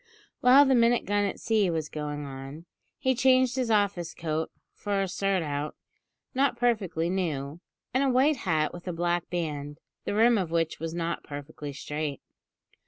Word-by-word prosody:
While 265 +3 +7
the 265 - +3
"minute 235 -1 +4
gun 205 0 +1
at 200 - -3
sea" 215 -4 +2
was 160 -2 -1
going 150 -1 -4
on, 135 +4 -8 0.3
he 260 - +2
changed 255 0 +4
his 255 -3 -1
office 200 -6 +1
coat 160 0 -2 0.2
for 200 -1 -2
a - - -2
surtout, 165 -7 -1 0.6
not 265 -2 +2
perfectly 210 -9 +1
new, 160 -5 -2 0.3
and 260 +2 +3
a 275 - +3
white 265 +4 +3
hat 160 -8 0
with 175 +1 -10
a 180 - -2
black 175 0 -1
band, 150 -4 -3 0.3
the - - -1
rim 230 +1 +5
of 180 -4 -2
which 165 -1 0
was 165 0 -4
not 170 0 -2
perfectly 145 0 -7
straight. 145 +1 -4
175 Hz, 170 wpm, -28 LUFS, 155-230 Hz, 0.6 s, While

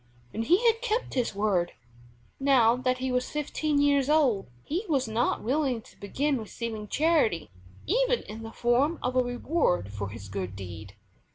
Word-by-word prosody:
And 225 - -2
he 365 - +3
had 455 0 +4
kept 485 -1 -1
his 245 -6 -1
word. 195 -4 +1 0.7
Now 255 -4 +5
that 255 0 0
he 260 0 -2
was 250 0 0
fifteen 300 0 -1
years 285 -1 +3
old 275 -10 +3 0.2
he 345 +8 -2
was 270 -5 +1
not 225 +2 0
willing 260 0 +1
to - - -19
begin 275 +7 -1
receiving 220 -1 -5
charity 290 - +1 0.3
even - - +2
in 220 +2 -8
the 225 0 -7
form 250 +8 +2
of 250 +1 -1
a 255 - +5
reward 245 - 0
for 100 -1 -4
his 100 -1 -9
good 95 -1 -5
deed. 100 +2 -9
250 Hz, 170 wpm, -28 LUFS, 210-295 Hz, 0.7 s, Now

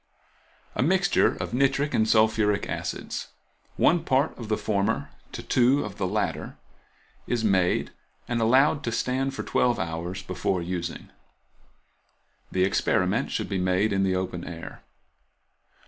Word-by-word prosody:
A - - -1
mixture 180 +5 +3
of - - -5
nitric 135 +3 +1
and 110 0 +2
sulphuric 110 -2 +3
acids, - - -4 0.5
one 165 0 +3
part 135 0 +1
of 115 - -8
the 110 - +1
former 100 -2 -1 0.2
to - - -7
two 130 +3 +3
of 105 -2 -8
the 95 - 0
latter, 105 +3 -2 0.7
is 120 -2 -1
made, 95 -4 +2 0.4
and 120 -1 -1
allowed 135 +6 +4
to 115 - -1
stand 130 +3 -1
for - - -4
twelve 120 -1 +1
hours 85 +3 -4
before 95 - -1
using. 85 0 -5 1.4
The, 95 - +1
experiment 95 - +1
should - - -2
be 95 - -2
made 95 +3 +1
in 95 - +1
the 95 -1 +1
open 90 -2 -3
air. 85 -1 -8
110 Hz, 140 wpm, -26 LUFS, 95-130 Hz, 1.4 s, allowed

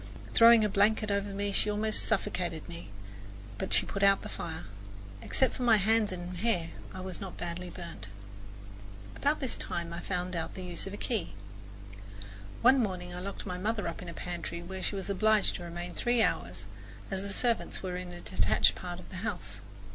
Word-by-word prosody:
Throwing 230 -1 +8
a - - +4
blanket 210 +2 +3
over 200 0 +1
me, 200 +1 -2
she 210 - +2
almost 215 +1 0
suffocated 180 -6 -1
me, 85 +3 -8 0.7
but - - -3
she - - +5
put 195 - -4
out 195 0 +5
the - - -6
fire. 160 -1 -5 0.6
Except 265 - +2
for - - -7
my 235 -3 +6
hands 215 +1 +3
and 180 0 -5
hair 175 -5 +1 0.2
I 185 - -7
was 185 0 -5
not 190 -2 -6
badly 175 +1 -4
burned. 170 -1 -7 1.1
About 290 +2 +1
this 265 -4 0
time 170 -1 -3
I 170 - -4
found 180 0 -2
out 165 -1 -3
the 185 - -6
use 175 +1 -4
of 195 - -6
a - - -4
key. 215 -8 -2 1.3
One 260 +3 +7
morning 180 -4 -2
I 180 - -5
locked 195 +2 -5
my 180 -2 -3
mother 210 0 0
up 165 - -4
in 180 - -7
the 170 - -6
pantry, 170 -1 -4
where 190 +2 -6
she 200 - -1
was 195 -2 -3
obliged 215 +1 +3
to 175 - -8
remain 175 +1 -5
three 240 -1 +2
hours, - - -1 0.5
as 190 -1 0
the 200 0 -3
servants 235 0 0
were 180 -1 -2
in 180 0 -5
a 175 0 -8
detached 95 +4 +3
part 175 -1 -6
of - - -12
the 185 - -6
house. 105 - -4
185 Hz, 200 wpm, -31 LUFS, 175-210 Hz, 1.3 s, Throwing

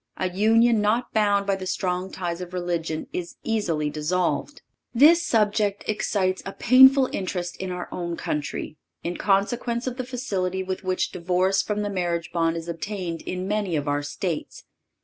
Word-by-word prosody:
A 185 -1 -1
union 225 +3 +4
not 220 +4 0
bound 205 -2 +2
by 195 -1 +1
the 190 -1 -6
strong 185 0 -2
ties 175 -1 -4
of 180 0 -7
religion 170 -3 -2
is 175 -1 -4
easily 165 -10 0
dissolved. 170 - -1 0.3
This 315 +7 +7
subject 210 -6 +1
excites 190 -3 0
a 195 - -6
painful 265 +2 +7
interest 180 -2 -3
in 190 - -4
our 180 0 -4
own 170 -1 -4
country, 150 +1 -4 0.3
in 175 +1 -3
consequence 235 +4 0
of 255 -1 -3
the 255 - -2
facility 195 -8 -2
with 185 +1 -4
which 185 0 -1
divorce 185 +2 +1
from 210 +1 -2
the 205 - -2
marriage 175 -3 -2
bond 165 -1 +1
is 165 0 -6
obtained 170 0 -4
in 185 +1 -3
many 205 -4 -1
of 145 -1 -2
our 145 0 +1
States. 150 +3 -4
185 Hz, 170 wpm, -25 LUFS, 175-210 Hz, 0.3 s, This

